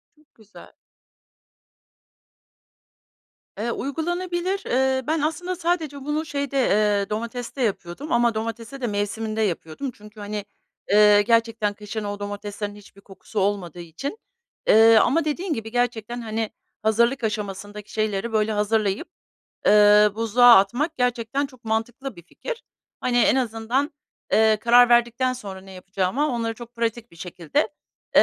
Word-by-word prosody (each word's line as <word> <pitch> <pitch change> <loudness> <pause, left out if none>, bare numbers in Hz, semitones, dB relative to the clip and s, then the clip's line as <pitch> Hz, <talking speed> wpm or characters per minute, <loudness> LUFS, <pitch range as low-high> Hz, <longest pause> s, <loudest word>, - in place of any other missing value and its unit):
Çok 305 -1 -30
güzel. 215 -2 -16 2.9
Eee, 230 +3 -2
uygulanabilir. 350 +7 -2
Eee, 260 +1 +1
ben 315 0 +1
aslında 355 +4 -2
sadece 330 -5 -1
bunu, 300 +2 -1
şeyde, 280 -3 -3
eee, 210 -5 +2
domateste 235 +4 -4
yapıyordum 210 - -3
ama 235 -3 +3
domatese 230 +4 -5
de 240 - -1
mevsiminde 215 +2 -2
yapıyordum. 185 - -3
Çünkü, 210 -1 -15
hani, 205 0 -5 0.5
eee, 210 0 +7
gerçekten 225 -1 +1
kışın 210 +1 -6
o 205 0 -4
domateslerin 205 0 -5
hiçbir 200 -1 -16
kokusu 200 +2 -7
olmadığı 190 -4 -1
için, 175 - -6 0.5
eee, 225 +1 +7
ama 310 +9 +3
dediğin 330 +4 -2
gibi 225 -4 -5
gerçekten, 240 -1 -1
hani, 220 -1 -3 0.3
hazırlık 235 +4 +2
aşamasındaki 205 -1 -4
şeyleri 215 +1 -1
böyle 215 0 +2
hazırlayıp, 210 - 0 0.6
eee, 210 0 +7
buzluğa 230 +2 +6
atmak 250 - +1
gerçekten 250 +2 0
çok 255 -3 -19
mantıklı 230 +5 -3
bir 170 - -12
fikir. 475 - -7 0.4
Hani 245 -1 +1
en 250 - +4
azından, 245 +4 -1 0.4
eee, 220 0 +5
karar 240 +3 +5
verdikten 240 +2 +3
sonra 200 -6 -8
ne 190 0 -13
yapacağıma 190 +9 -1
onları 230 -3 -2
çok 240 +1 -12
pratik 235 0 -3
bir 170 - -18
şekilde, 175 - -2 0.5
eee - - +9
225 Hz, 135 wpm, -23 LUFS, 210-260 Hz, 2.9 s, eee